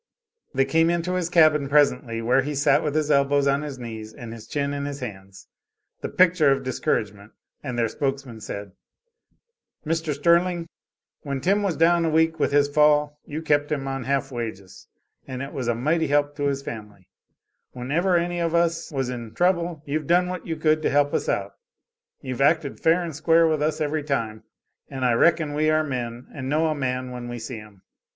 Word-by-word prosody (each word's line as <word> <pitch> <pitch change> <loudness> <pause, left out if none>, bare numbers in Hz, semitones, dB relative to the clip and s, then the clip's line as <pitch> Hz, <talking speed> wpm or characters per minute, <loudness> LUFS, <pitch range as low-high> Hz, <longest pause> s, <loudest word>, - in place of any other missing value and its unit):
They 135 0 +3
came 165 +4 +3
into 170 +1 -1
his 180 -2 -1
cabin 155 -5 +4
presently, 140 -5 +2
where 125 +3 +3
he 145 +2 -4
sat 140 - +3
with 150 -1 -2
his 155 -1 +1
elbows 140 0 +3
on 140 +1 +2
his 145 -3 -6
knees 110 -3 -7
and 115 -2 -8
his 115 -2 -11
chin 140 -1 -2
in 140 0 -3
his 145 0 -5
hands 95 -5 -9 0.5
the - - -4
picture 175 -5 +4
of 135 0 0
discouragement 110 -7 -2 0.3
and 130 -4 -5
their 115 -1 +2
spokesman 135 -3 -4
said: 100 -1 -6 1.1
"Mr. 160 -1 -1
Sterling, 170 +3 +2 0.6
when 140 -2 -3
Tim 195 +9 +2
was 195 -5 -1
down 170 +1 +4
a 165 - +1
week 160 0 +2
with 145 - +1
his 145 0 +4
fall 150 0 +3
you 155 +2 -5
kept 145 -1 +1
him 135 -2 -2
on 135 -2 -4
half 140 0 -1
wages 110 -6 -7 0.4
and 130 0 -5
it 140 - -8
was 125 -3 -4
a 120 - +1
mighty 155 +7 +1
help 145 0 +1
to 145 - -1
his 140 0 -2
family; 105 -6 -9 0.7
whenever 160 +9 +1
any 175 +1 -1
of 170 -1 0
us 170 -1 0
was 135 -3 -2
in 120 -3 -7
trouble 175 -3 0
you've 150 +1 -3
done 180 +1 +3
what 180 -2 -6
you 165 - -2
could 155 0 +2
to - - +1
help 145 0 +2
us - - -1
out; - - -1 0.7
you've 130 -2 -5
acted 150 0 +2
fair 165 +2 +3
and 165 -4 -5
square 165 +2 +4
with 155 -2 0
us 150 0 0
every 155 0 -1
time, 115 -7 -3 0.5
and 130 -2 -3
I 125 - +3
reckon 155 +3 +3
we 155 +1 +1
are 155 0 +3
men 125 -4 -4
and 130 -3 -5
know 155 +2 +2
a - - +1
man 130 -3 -3
when 120 -1 -7
we 120 - -5
see 115 +1 -6
him. 105 -3 -14
145 Hz, 200 wpm, -24 LUFS, 125-160 Hz, 1.1 s, cabin